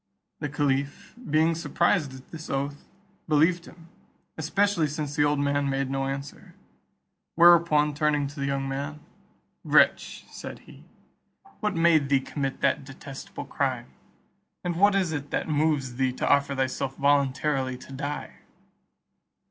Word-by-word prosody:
The 145 - -3
caliph 140 0 -1 0.2
being 160 +2 +3
surprised 165 -3 0
at 130 - -15
this 160 -1 -8
oath, 140 +1 -3 0.4
believed 165 +3 +2
him; 165 -1 -15 0.5
especially 170 +1 +1
since 145 -1 -4
the 150 - +3
old 145 0 +2
man 140 0 0
made 135 -1 -1
no 135 0 -1
answer. 140 +1 -7 0.8
Whereupon, 170 -3 +5
turning 150 -1 +1
to 140 +1 -8
the 140 - -1
young 135 0 -1
man, 140 +3 -4 0.6
"Wretch," - - +3
said - - -8
he, - - -15 0.7
"what 210 -3 -1
made 165 -4 +3
thee 140 -1 +4
commit 135 0 -4
that - - +1
detestable 135 0 -9
crime, 130 -3 -2 0.7
and 175 -1 -2
what 200 +2 +5
is 185 -4 +1
it 145 -2 -4
that - - -2
moves 145 -5 0
thee 130 -1 +1
to - - -2
offer 140 0 +3
thyself 135 0 -2
voluntarily 140 -1 +1
to 130 - -13
die?" 145 +2 -5
145 Hz, 140 wpm, -26 LUFS, 135-160 Hz, 0.8 s, Whereupon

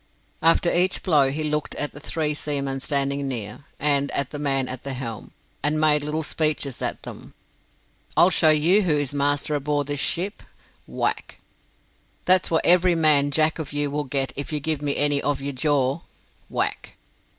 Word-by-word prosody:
After 165 +1 +3
each 180 +2 +1
blow 145 -7 +3
he 150 +3 -3
looked 150 0 -2
at 145 - -3
the - - -12
three 150 0 -2
seamen 140 -2 -3
standing 140 0 0
near, 115 0 -6
and 140 -1 +2
at 140 -1 -1
the 145 - -6
man 135 -3 +1
at 130 -1 -6
the 140 - -6
helm, 120 -4 -7 0.3
and 150 +1 0
made 150 -1 +3
little 155 +2 -3
speeches 150 -4 -1
at - - -3
them. - - -10 0.8
"I'll 180 - +5
show 160 - +4
you 160 +7 +4
who 165 -6 +1
is 145 -2 -3
master 145 +1 0
aboard 145 0 -1
this 145 0 -3
ship." 190 +8 0 0.5
Whack! - - -3 0.9
"That's 185 0 +3
what 160 - 0
every 180 0 +5
man 150 -3 +4
Jack 155 +3 +1
of 150 -3 -6
you 145 -1 -1
will 150 0 -3
get 135 0 -1
if 140 +3 -5
you 150 - -1
give 155 0 -2
me 145 -1 -1
any 145 -1 +2
of 145 -2 -1
your 140 +1 -4
jaw." 140 +1 0 0.5
Whack! - - -3
145 Hz, 180 wpm, -23 LUFS, 140-155 Hz, 0.9 s, I'll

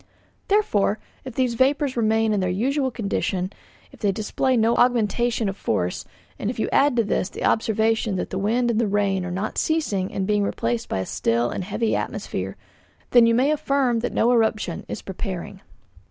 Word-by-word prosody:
Therefore, 220 - +2 0.3
if 260 -3 -7
these 255 -2 +1
vapours 270 +2 +1
remain 220 -1 +2
in 205 - +1
their 185 -1 0
usual 260 +9 0
condition, 200 -4 -2 0.4
if - - -16
they 205 - +2
display 225 +5 0
no 225 +1 +3
augmentation 240 -1 +2
of 195 - -2
force, 90 - -2 0.3
and 205 - -2
if 245 - -4
you 220 - 0
add 280 -2 +4
to 230 - +3
this 200 -2 -1
the - - -7
observation 220 -1 +1
that 180 - -3
the 190 - -2
wind 235 +4 +1
and 220 -2 0
rain 200 -2 +1
are 180 - -4
not 190 +4 -2
ceasing 210 -13 0
and 190 - -2
being 210 +1 +1
replaced 120 - -2
by - - -1
a - - -3
still 115 +6 0
and - - -3
heavy 220 +3 0
atmosphere, - - -4 0.5
then 240 -2 +7
you 230 - +3
may 265 +5 +3
affirm 275 -5 +1
that 235 - -2
no 235 - +2
eruption 220 -7 0
is - - -5
preparing." 190 0 -6
220 Hz, 185 wpm, -23 LUFS, 195-245 Hz, 0.5 s, then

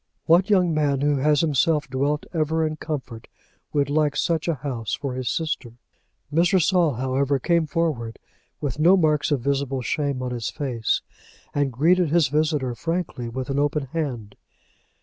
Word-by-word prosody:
What 175 +5 +4
young 180 -5 +3
man 145 -3 +1
who 145 0 +2
has 150 +1 +3
himself 150 0 +1
dwelt 140 +3 -1
ever 160 0 +1
in 155 0 -3
comfort 130 -8 -6 0.4
would 145 -2 +1
like 145 0 +1
such 165 -2 0
a 170 - +1
house 125 -6 -3
for 140 -3 -4
his 130 -2 -3
sister? 155 -7 -3 0.6
Mr. 175 +4 +4
Saul, 175 -3 +3
however, 135 +3 0
came 170 +3 +1
forward 150 - -2 0.4
with 145 -1 -3
no 175 +5 +6
marks 155 -3 +2
of 145 -5 0
visible 135 -1 -1
shame 140 -2 -1
on 125 - -3
his 120 -3 -3
face, 125 -7 -1 0.5
and 145 -2 0
greeted 165 +7 +3
his 160 -3 +3
visitor 150 -3 0
frankly 165 -4 -3
with 130 +3 -4
an 140 - 0
open 145 -2 0
hand. 125 -11 -3
145 Hz, 165 wpm, -23 LUFS, 130-160 Hz, 0.6 s, no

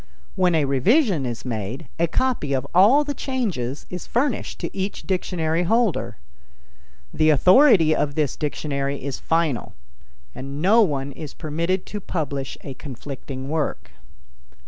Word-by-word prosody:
When 180 -2 +3
a 155 -3 +2
revision 160 - +2
is 120 0 -5
made, 120 +4 -4
a 170 - +3
copy 235 - 0
of 130 0 -1
all 215 +12 +6
the 290 0 -3
changes 200 - -3
is 180 -1 -6
furnished 250 0 -1
to - - -5
each 195 +1 -3
dictionary 170 -3 -1
holder. 220 +2 +1 1.0
The 155 0 +3
authority 180 - +6
of 145 -1 -1
this 150 -5 0
dictionary 140 -2 -3
is 140 -1 -4
final, 155 - -1 0.6
and 140 +2 -7
no 205 +8 +5
one 140 -8 0
is 150 0 -9
permitted 170 +4 -2
to 210 - -6
publish 140 -7 -4
a 140 - -7
conflicting 135 0 -7
work. 155 0 -2
155 Hz, 140 wpm, -23 LUFS, 140-190 Hz, 1.0 s, all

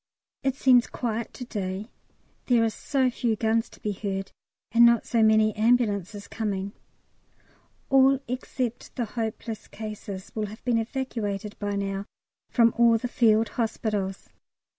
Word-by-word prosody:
It 270 -1 0
seems 255 -3 +5
quiet 230 -2 -3
to 250 - -6
day; 200 0 -4 0.6
there 240 -3 +4
are 225 - +1
so 260 +2 0
few 235 -2 0
guns 225 +1 +1
to - - -17
be 210 - -2
heard, 195 -1 -4 0.4
and 235 +1 +6
not 235 -1 +5
so 230 - +1
many 220 0 +4
ambulances 210 -3 +1
coming. 200 -3 -3 1.2
All 270 0 +6
except 250 -1 -4
the 240 - -1
hopeless 225 0 -5
cases 210 -3 -7
will 215 -1 -2
have 215 +4 -12
been 240 -2 +2
evacuated 220 -4 -3
by 205 -1 -2
now 195 0 -2 0.4
from 230 -2 +4
all 235 -1 +6
the 245 - -3
Field 225 -2 +3
Hospitals. 210 -4 -2
220 Hz, 140 wpm, -26 LUFS, 205-240 Hz, 1.2 s, and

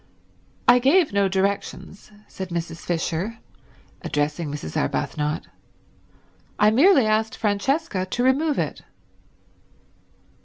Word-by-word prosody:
"I 245 +1 +7
gave 290 - +3
no 200 -1 +2
directions," 195 +1 -3 0.2
said 190 -1 -7
Mrs. 165 -1 -4
Fisher, 175 +5 -2 0.6
addressing 150 +1 -2
Mrs. 145 - -6
Arbuthnot, 150 +1 -2 1.1
"I 210 +1 +4
merely 275 - +5
asked 215 +1 0
Francesca 210 - -1
to 245 +6 -2
remove 285 +4 +2
it." - - -2
200 Hz, 100 wpm, -23 LUFS, 170-250 Hz, 1.1 s, I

